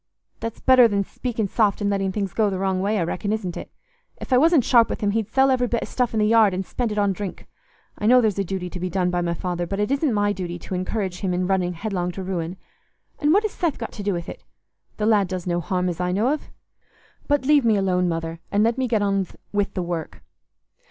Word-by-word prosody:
"That's 230 Hz, 0 st, -5 dB
better 255 Hz, -2 st, +6 dB
than 200 Hz, -2 st, 0 dB
speaking 225 Hz, 0 st, -3 dB
soft 205 Hz, 0 st, +1 dB
and 205 Hz, -, -1 dB
letting 195 Hz, -1 st, 0 dB
things 195 Hz, -1 st, -3 dB
go 215 Hz, -2 st, +2 dB
the 190 Hz, -, -3 dB
wrong 190 Hz, -1 st, 0 dB
way, 210 Hz, +2 st, 0 dB
I 180 Hz, -, +1 dB
reckon, 190 Hz, +5 st, -2 dB
isn't 200 Hz, -5 st, -2 dB
it? -, -, -8 dB, 0.5 s
If -, -, -3 dB
I -, -, +6 dB
wasn't 320 Hz, -2 st, +5 dB
sharp 235 Hz, -2 st, +4 dB
with -, -, -4 dB
him 205 Hz, -1 st, +1 dB
he'd 220 Hz, 0 st, -1 dB
sell 265 Hz, +3 st, +3 dB
every 250 Hz, -1 st, +2 dB
bit 235 Hz, 0 st, -1 dB
o' -, -, -3 dB
stuff 245 Hz, -3 st, -1 dB
i' -, -, +1 dB
th' 215 Hz, -, +3 dB
yard 220 Hz, -4 st, +4 dB
and 190 Hz, +1 st, -3 dB
spend 240 Hz, +2 st, -2 dB
it 210 Hz, -, -4 dB
on 200 Hz, -1 st, +2 dB
drink. 195 Hz, -1 st, -6 dB, 0.5 s
I 210 Hz, -, 0 dB
know 250 Hz, +2 st, +7 dB
there's 215 Hz, -5 st, +1 dB
a -, -, +2 dB
duty 190 Hz, -1 st, -4 dB
to 180 Hz, -, -6 dB
be 185 Hz, +1 st, -2 dB
done 180 Hz, 0 st, 0 dB
by 175 Hz, 0 st, 0 dB
my 170 Hz, -1 st, -1 dB
father, 175 Hz, 0 st, -3 dB
but 195 Hz, +2 st, -3 dB
it 210 Hz, +5 st, 0 dB
isn't 280 Hz, 0 st, +1 dB
my 205 Hz, -1 st, +1 dB
duty 175 Hz, -3 st, -5 dB
to 175 Hz, -, -8 dB
encourage 185 Hz, 0 st, -2 dB
him 185 Hz, -3 st, -1 dB
in 180 Hz, 0 st, 0 dB
running 180 Hz, -1 st, 0 dB
headlong 180 Hz, -1 st, -3 dB
to 190 Hz, -, -6 dB
ruin. 180 Hz, -1 st, -3 dB, 0.6 s
And 300 Hz, -3 st, +2 dB
what 405 Hz, +5 st, +4 dB
has 430 Hz, -, -1 dB
Seth 335 Hz, -6 st, -1 dB
got 230 Hz, -, -5 dB
to -, -, -8 dB
do 200 Hz, 0 st, 0 dB
with 170 Hz, -2 st, -4 dB
it? -, -, -9 dB, 0.5 s
The 210 Hz, -, -1 dB
lad 210 Hz, -3 st, +3 dB
does 180 Hz, -1 st, -5 dB
no 175 Hz, -1 st, 0 dB
harm 180 Hz, +2 st, -1 dB
as 175 Hz, 0 st, -3 dB
I 180 Hz, 0 st, 0 dB
know 210 Hz, +7 st, +1 dB
of. 305 Hz, -, -6 dB, 0.8 s
But 290 Hz, -2 st, +1 dB
leave 290 Hz, -1 st, +5 dB
me 225 Hz, -2 st, +3 dB
alone, 180 Hz, -2 st, +1 dB
Mother, 165 Hz, 0 st, -3 dB
and 205 Hz, +1 st, +3 dB
let 230 Hz, +3 st, +1 dB
me 260 Hz, -, +1 dB
get 220 Hz, -3 st, +1 dB
on 195 Hz, -2 st, +1 dB, 0.3 s
with 205 Hz, 0 st, 0 dB
the 185 Hz, -, -1 dB
work." 170 Hz, -2 st, -5 dB
200 Hz, 260 wpm, -23 LUFS, 180-225 Hz, 0.8 s, know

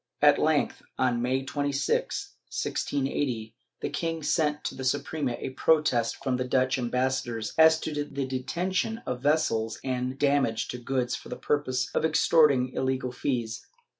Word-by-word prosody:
At -, -, +7 dB
length, -, -, +1 dB, 0.2 s
on 125 Hz, -2 st, +1 dB
May 130 Hz, +2 st, 0 dB
26, 145 Hz, -, -1 dB, 0.2 s
1680, 130 Hz, -5 st, -2 dB, 0.3 s
the -, -, -2 dB
king 165 Hz, -1 st, -2 dB
sent 150 Hz, -1 st, +1 dB
to -, -, -3 dB
the 130 Hz, -, -7 dB
Suprema 130 Hz, 0 st, -1 dB
a -, -, -5 dB
protest 130 Hz, -4 st, +2 dB
from 130 Hz, -2 st, 0 dB
the 130 Hz, -, -1 dB
Dutch 130 Hz, +1 st, +1 dB
ambassador 125 Hz, -1 st, -1 dB, 0.2 s
as 160 Hz, 0 st, +6 dB
to 150 Hz, -2 st, -2 dB
the 140 Hz, -2 st, -3 dB
detention 180 Hz, -, -2 dB
of 125 Hz, -1 st, -3 dB
vessels 125 Hz, -7 st, +1 dB
and 130 Hz, 0 st, -2 dB
damage 140 Hz, -5 st, +1 dB
to 125 Hz, -, -5 dB
goods 125 Hz, 0 st, -1 dB
for -, -, -10 dB
the -, -, -4 dB
purpose 130 Hz, -4 st, -1 dB
of -, -, +1 dB
extorting 150 Hz, -4 st, +4 dB
illegal 130 Hz, -1 st, -1 dB
fees. 120 Hz, -3 st, -3 dB
130 Hz, 150 wpm, -27 LUFS, 125-150 Hz, 0.3 s, At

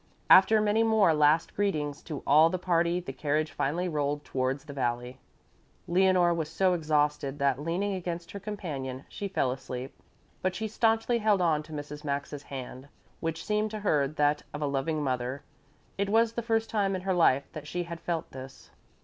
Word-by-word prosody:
After 215 Hz, +3 st, +8 dB
many 210 Hz, +1 st, +2 dB
more 220 Hz, -6 st, +4 dB
last 150 Hz, +2 st, +3 dB
greetings 150 Hz, -8 st, -1 dB
to 150 Hz, -4 st, -6 dB
all 155 Hz, +3 st, +6 dB
the 185 Hz, -, -1 dB
party 175 Hz, -1 st, +1 dB
the 170 Hz, -6 st, -7 dB
carriage 150 Hz, +3 st, -1 dB
finally 170 Hz, +6 st, -1 dB
rolled 145 Hz, -2 st, -2 dB
towards 130 Hz, +2 st, -2 dB
the 145 Hz, -, -8 dB
valley. 125 Hz, -1 st, -2 dB, 0.7 s
Leonore 180 Hz, -1 st, +4 dB
was 160 Hz, -2 st, -3 dB
so 185 Hz, +3 st, +2 dB
exhausted 150 Hz, -3 st, 0 dB
that, 140 Hz, -1 st, +1 dB
leaning 180 Hz, +6 st, -1 dB
against 175 Hz, -2 st, -5 dB
her 200 Hz, -, -6 dB
companion, 150 Hz, -11 st, -5 dB
she 200 Hz, -, -5 dB
fell 160 Hz, -9 st, 0 dB
asleep, 130 Hz, 0 st, -6 dB, 0.5 s
but 185 Hz, 0 st, -1 dB
she 220 Hz, -, -2 dB
staunchly 225 Hz, +2 st, +1 dB
held 210 Hz, -2 st, +3 dB
on 160 Hz, -4 st, +2 dB
to 155 Hz, +1 st, -14 dB
Mrs. 150 Hz, 0 st, -7 dB
Maxa's 140 Hz, 0 st, -3 dB
hand, 130 Hz, 0 st, -7 dB, 0.3 s
which 165 Hz, -1 st, -3 dB
seemed 210 Hz, 0 st, 0 dB
to 215 Hz, 0 st, -6 dB
her 150 Hz, -8 st, +2 dB
that 150 Hz, 0 st, +1 dB
of 150 Hz, -, -3 dB
a -, -, +1 dB
loving 145 Hz, +2 st, -1 dB
mother. 130 Hz, 0 st, -2 dB, 0.6 s
It 200 Hz, 0 st, 0 dB
was 225 Hz, +1 st, +3 dB
the 235 Hz, -, -2 dB
first 225 Hz, -1 st, 0 dB
time 200 Hz, -3 st, 0 dB
in 185 Hz, -, -4 dB
her 190 Hz, 0 st, 0 dB
life 140 Hz, -6 st, +3 dB
that 150 Hz, -1 st, -8 dB
she 175 Hz, +3 st, -2 dB
had 170 Hz, -1 st, -7 dB
felt 165 Hz, -1 st, -3 dB
this. 130 Hz, 0 st, -11 dB
160 Hz, 185 wpm, -28 LUFS, 140-190 Hz, 0.7 s, After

